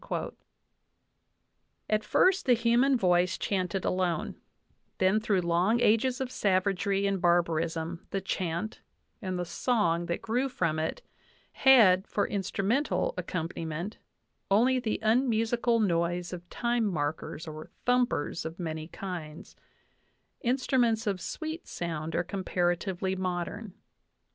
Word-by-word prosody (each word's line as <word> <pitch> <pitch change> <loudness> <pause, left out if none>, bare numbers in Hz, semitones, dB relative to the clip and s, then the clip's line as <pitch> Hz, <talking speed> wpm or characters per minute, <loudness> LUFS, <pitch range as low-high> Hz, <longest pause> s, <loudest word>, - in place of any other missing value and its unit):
At 215 0 +1
first 375 - +3
the 250 - +6
human 240 +4 +3
voice 180 -3 +2
chanted 185 -1 -1
alone; 180 -3 -1 0.6
then 190 +3 +3
through 210 -4 +1
long 175 +7 +2
ages 245 +3 +3
of 260 -1 -3
savagery 195 0 +1
and 195 -2 0
barbarism 170 -1 0
the 195 - -1
chant 185 +1 -3 0.4
and 185 -3 -3
the 175 - -2
song 175 -6 0
that 170 - -3
grew 250 +4 0
from 165 -10 -1
it 160 - -3 0.5
had, 215 -9 +6
for 205 - 0
instrumental 210 - 0
accompaniment, 165 +2 -4 0.5
only 245 +6 +4
the 225 -3 -1
unmusical 230 0 +2
noise 175 -2 0
of 175 0 -8
time 240 -1 0
markers 155 -1 -3
or 155 0 -8 0.2
"thumpers" 245 -11 +1
of 160 +1 -6
many 160 -2 -4
kinds: 170 -5 -7 0.8
instruments 245 -3 +1
of 195 -4 -1
sweet 315 - -5
sound 165 -2 -4
are - - +1
comparatively 185 0 -1
modern. 185 +2 -4
190 Hz, 115 wpm, -29 LUFS, 170-230 Hz, 0.8 s, the